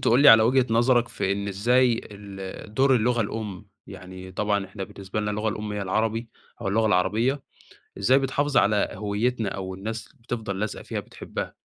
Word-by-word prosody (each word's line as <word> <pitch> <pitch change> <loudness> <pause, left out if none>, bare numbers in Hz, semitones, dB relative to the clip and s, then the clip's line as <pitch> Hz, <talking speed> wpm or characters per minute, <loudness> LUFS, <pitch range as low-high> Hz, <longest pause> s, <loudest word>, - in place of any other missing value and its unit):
تقول 120 +3 +4
لي 145 - +9
على 110 0 +9
وجهة 125 +3 +3
نظرك 120 +1 +3
في 95 - -1
إن 100 0 -3
إزاي 120 +4 +3
ال 100 0 -9
دور 135 +2 +4
اللغة 120 +1 +1
الأم، 105 -2 -4 0.2
يعني 95 -1 -10
طبعًا 100 0 0
إحنا 95 0 -6
بالنسبة 95 +2 -5
لنا 105 0 -1
اللغة 105 +1 -1
الأم 105 0 -4
هي 105 - -3
العربي 110 +4 -1 0.3
أو 105 - -2
اللغة 110 +3 +2
العربية، 115 +8 +1 0.6
إزاي 125 +7 +4
بتحافظ 140 +1 -1
على 105 -3 +4
هويّتنا 105 +3 -1
أو 95 -1 -5
الناس 110 +4 -5
بتفضل 115 -6 -5
لازقة 110 +1 -3
فيها - - -4
بتحبّها؟ - - -7
110 Hz, 175 wpm, -25 LUFS, 100-120 Hz, 0.6 s, لي